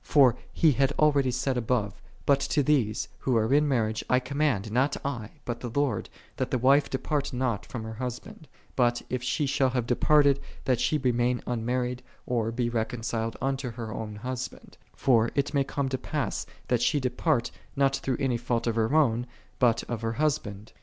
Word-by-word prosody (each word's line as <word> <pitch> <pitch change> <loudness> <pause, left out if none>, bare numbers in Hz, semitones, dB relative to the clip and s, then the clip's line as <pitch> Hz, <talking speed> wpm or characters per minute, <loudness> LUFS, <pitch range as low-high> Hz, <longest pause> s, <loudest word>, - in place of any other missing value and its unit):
'* - - -35
F'or 130 -5 +5 0.2
he 160 - +4
had 135 +1 +2
already 145 -3 +3
said 125 +1 -1
above, 110 -5 -1
" - - -27
Bui 140 - +5
lo 140 - -9
Ihese, 140 -9 +1
who 125 -3 +1
are 110 +3 +2
in 150 +1 +4
marriage, 110 -5 0
I 125 - +4
com 140 +3 -6
mand, 110 -9 +1
nol 130 +4 +3 0.2
I, 120 -6 -3 0.2
bul 120 - -1
the 120 - -5
Lord, 135 -9 0 0.3
that - - -1
the - - +1
wife 135 +4 +4
de 130 - -1
part 145 +1 -2
nol 125 -4 0
from 120 -3 -7
her 110 0 -6
husband: 125 +5 -6 0.3
bul, 120 -2 +3 0.2
if 125 -1 -1
she 130 +4 0
shall 135 -1 +2
have 125 -2 -1
departed, 140 +3 +4 0.3
lhal 130 -3 +2
she 155 - +2
remain 125 -2 +1
unmarried, 125 +1 -1 0.2
or 115 -2 0
be 120 +1 -1
reconciled 115 0 -2
unto 135 -1 -1
her 115 -2 -6
own 105 -1 -5
husband; 125 +4 -6
'* - - -32
for 115 -3 +5
it 140 +1 0
may 140 -1 +3
come 140 0 -2
to 130 -1 -2
pass 150 +1 -3 0.2
thai 125 - +3
she 145 +5 +2
depart, 130 +1 0 0.2
not 135 0 +2
through 130 -2 -2
any 130 -4 +1
fault 120 0 -1
of 115 - +1
her 115 +5 +1
own, 125 -6 +3 0.3
bul 120 -2 +5
of 120 -3 -3
her 115 0 -1
husband. 110 -7 -2
125 Hz, 200 wpm, -27 LUFS, 115-140 Hz, 0.3 s, F'or